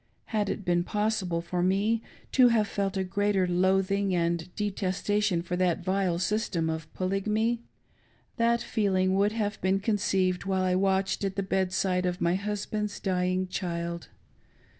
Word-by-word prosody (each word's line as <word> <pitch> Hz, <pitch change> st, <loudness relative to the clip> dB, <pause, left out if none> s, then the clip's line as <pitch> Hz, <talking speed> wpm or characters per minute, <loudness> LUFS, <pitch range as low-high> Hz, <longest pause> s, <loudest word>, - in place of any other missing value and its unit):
Had 210 Hz, -2 st, +1 dB
it 205 Hz, -, -4 dB
been 175 Hz, 0 st, +2 dB
possible 205 Hz, -4 st, -1 dB
for^i^me 190 Hz, +6 st, +1 dB, 0.3 s
to 255 Hz, -2 st, +6 dB
have 225 Hz, -3 st, +3 dB
felt 195 Hz, -2 st, -2 dB
a 190 Hz, -, +1 dB
greater 195 Hz, 0 st, +1 dB
loathing 190 Hz, +2 st, +2 dB
and 170 Hz, 0 st, 0 dB
detestation 205 Hz, -2 st, 0 dB
for; 180 Hz, 0 st, -3 dB
that 180 Hz, -2 st, +1 dB
vile, 185 Hz, -2 st, +1 dB
system 180 Hz, -4 st, 0 dB
of 160 Hz, -1 st, -6 dB
Polygamy, 215 Hz, +5 st, 0 dB, 0.8 s
that 235 Hz, 0 st, +2 dB
feeling 190 Hz, -5 st, +1 dB
would 200 Hz, +2 st, +2 dB
have 210 Hz, -2 st, -2 dB
been 190 Hz, +1 st, +2 dB
conceived 195 Hz, -3 st, +1 dB
while 190 Hz, -1 st, 0 dB
I 185 Hz, -1 st, +2 dB
watched 190 Hz, +1 st, +1 dB
at 195 Hz, -1 st, -1 dB
the 195 Hz, -, -1 dB
bed 190 Hz, -1 st, 0 dB
side 185 Hz, -1 st, +1 dB
of 180 Hz, +1 st, -2 dB
my 170 Hz, -2 st, +2 dB
husband's 210 Hz, +1 st, -3 dB
dying. 185 Hz, 0 st, 0 dB
child. 170 Hz, -2 st, -4 dB
190 Hz, 150 wpm, -28 LUFS, 180-205 Hz, 0.8 s, to